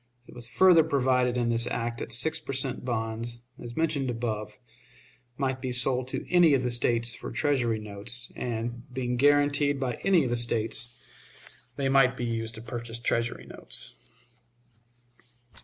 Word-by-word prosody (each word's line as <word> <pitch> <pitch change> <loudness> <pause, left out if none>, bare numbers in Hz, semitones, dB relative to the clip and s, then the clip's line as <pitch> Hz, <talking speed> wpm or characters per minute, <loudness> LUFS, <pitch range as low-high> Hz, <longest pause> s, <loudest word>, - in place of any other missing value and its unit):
It - - -15
was 120 -1 -6
further 170 +5 +5
provided 130 -4 +1
in 120 -1 0
this 115 0 +5
act 115 -1 -3
that - - -6
six 160 +6 0
per 135 - -6
cent. 130 -1 -1
bonds, 115 -1 -3 0.2
as 120 - -8
above - - -16
mentioned, 135 -7 -1 1.1
might 130 -2 -2
be 130 - -3
sold 125 +1 +3
to - - -3
any 175 -5 +6
of 130 - 0
the 125 - -1
States 120 0 +2
for - - -6
Treasury 125 -7 0
notes, 110 +4 -3
and, 120 +1 -5
being 125 -1 -2
guaranteed 145 +1 +3
by 125 -3 -3
any 185 -5 +4
of 125 - -2
the 120 - +1
States, 120 +1 -1 0.7
they 140 - -1
might 135 -2 +4
be 120 - -3
used 115 -1 -3
to 110 - -9
purchase 120 -1 -6
Treasury 120 0 -2
notes. - - -7
125 Hz, 160 wpm, -27 LUFS, 115-135 Hz, 1.1 s, any